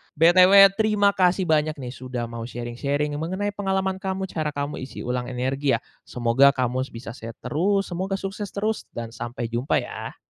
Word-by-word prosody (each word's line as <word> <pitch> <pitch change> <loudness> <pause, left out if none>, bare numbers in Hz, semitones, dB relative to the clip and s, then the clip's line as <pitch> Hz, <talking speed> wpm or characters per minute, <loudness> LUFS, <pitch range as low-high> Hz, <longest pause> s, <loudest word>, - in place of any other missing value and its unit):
btw, 185 +5 +7
terimakasih 200 -3 +2
banyak 155 -2 +1
nih, 130 -4 -7
sudah 125 -2 -5
mau 115 0 -5
sharing-sharing 130 +5 -2
mengenai 190 +6 -2
pengalaman 190 -2 -1
kamu, 190 0 -3
cara 155 -2 -3
kamu 145 +1 -3
isi 130 - -7
ulang 125 0 -2
energi, 135 +2 0
ya. - - -3 0.3
Semoga 125 +4 +3
kamus 130 +1 -1
bisa 115 0 -7
sehat 115 -1 -9
terus, 195 +5 0
semoga 190 +3 -2
sukses 195 +2 -5
terus, 215 +2 -2
dan 115 -1 -5
sampai 120 0 -5
jumpa, 120 +4 0
ya. - - -7
150 Hz, 165 wpm, -24 LUFS, 125-190 Hz, 0.3 s, btw